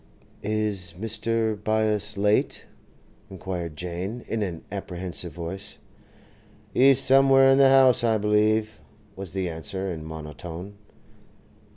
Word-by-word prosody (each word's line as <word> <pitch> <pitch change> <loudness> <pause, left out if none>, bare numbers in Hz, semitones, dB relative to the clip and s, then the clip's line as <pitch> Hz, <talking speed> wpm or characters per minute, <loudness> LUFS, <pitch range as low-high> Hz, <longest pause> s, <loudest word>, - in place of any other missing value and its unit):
'Is 105 -5 -2
Mr. 115 0 -1
Byass 110 -1 +1
late?' 105 +1 +1 0.6
inquired 90 -3 -5
Jane, 90 +8 -5
in 115 - -2
an 90 -5 -4
apprehensive 90 -3 -4
voice. 95 +6 -6 1.0
'He's 135 +1 +5
somewhere 135 0 +5
in 135 - +4
the 135 -1 +7
house, 130 -2 +5
I 115 -2 +3
believe,' 105 -4 +1 0.3
was 95 -3 -7
the 95 -2 -2
answer, 90 +4 -4
in 80 -2 -6
monotone. 80 +4 -8
100 Hz, 110 wpm, -25 LUFS, 90-110 Hz, 1.0 s, the